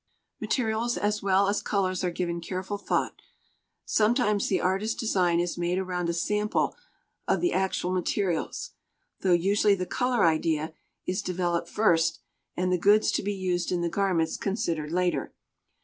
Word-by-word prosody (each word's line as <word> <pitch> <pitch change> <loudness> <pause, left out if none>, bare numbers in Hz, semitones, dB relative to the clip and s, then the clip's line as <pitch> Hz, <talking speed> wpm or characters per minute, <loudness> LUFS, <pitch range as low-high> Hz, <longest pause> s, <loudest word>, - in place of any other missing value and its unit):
Materials 235 -1 0
as 210 0 0
well 195 0 +3
as 205 +1 0
colors 185 -2 -1
are 180 - +1
given 170 0 -3
careful 190 +4 -4
thought. - - -1 0.6
Sometimes 215 -2 +2
the 190 - +1
artist's 195 +4 0
design 180 -6 +2
is 175 0 -2
made 175 +1 0
around 180 -2 -2
a - - 0
sample 210 +5 0 0.5
of - - +2
the 350 - +1
actual 190 -1 0
materials, 185 - -1 0.5
though 190 - +1
usually 200 +4 +3
the 185 -1 -3
color 250 +2 +1
idea 160 -1 +1 0.3
is 185 +1 -1
developed 175 -2 -1
first 165 -6 +2 0.4
and 180 0 0
the 180 - +2
goods 205 +4 +4
to - - 0
be 205 0 -2
used 180 -2 -1
in 175 -1 0
the 170 - 0
garments 170 -3 0
considered 165 -7 -2
later. 180 0 -1
185 Hz, 155 wpm, -27 LUFS, 175-205 Hz, 0.6 s, goods